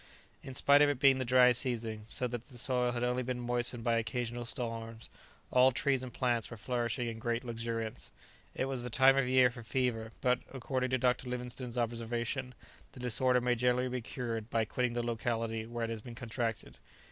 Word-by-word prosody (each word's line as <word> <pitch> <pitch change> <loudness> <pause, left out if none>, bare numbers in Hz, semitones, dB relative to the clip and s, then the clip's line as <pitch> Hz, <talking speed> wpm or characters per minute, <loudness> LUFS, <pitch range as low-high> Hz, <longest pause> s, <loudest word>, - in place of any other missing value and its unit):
In 135 - -8
spite 140 +3 +5
of 145 - +6
it 145 - 0
being 135 -1 +5
the 130 - -1
dry 125 0 +6
season, 115 -4 -3
so 125 - -1
that 120 -1 -4
the 130 - -13
soil 125 0 +1
had 120 0 -2
only 125 +1 +1
been 125 0 -3
moistened 120 -1 0
by 115 0 +2
occasional 120 +1 -2
storms, 115 -1 -4 0.4
all 130 +1 +6
trees 135 +1 +1
and 130 -1 -6
plants 120 -4 0
were 115 - -8
flourishing 120 +1 -2
in 115 -1 -5
great 120 +2 -1
luxuriance. 115 -1 -4 0.5
It - - 0
was 135 -2 -3
the 125 - -4
time 130 +3 +6
of 135 -2 +2
year 130 -1 +5
for 120 0 -9
fever, 115 -1 -1
but, 125 0 +2
according 130 0 -2
to 130 - +2
Dr. 125 0 +1
Livingstone's 125 0 -5
observation, 120 +2 -2 0.4
the - - -12
disorder 125 +1 +3
may 125 0 +2
generally 125 +1 +1
be 125 0 -3
cured 115 -2 -4
by 115 -1 +1
quitting 125 +2 -1
the 120 0 -1
locality 115 -1 -2
where 120 0 -4
it 115 - -4
has 110 -1 -4
been 120 +1 -9
contracted. 115 -2 -4
120 Hz, 200 wpm, -32 LUFS, 115-125 Hz, 0.5 s, of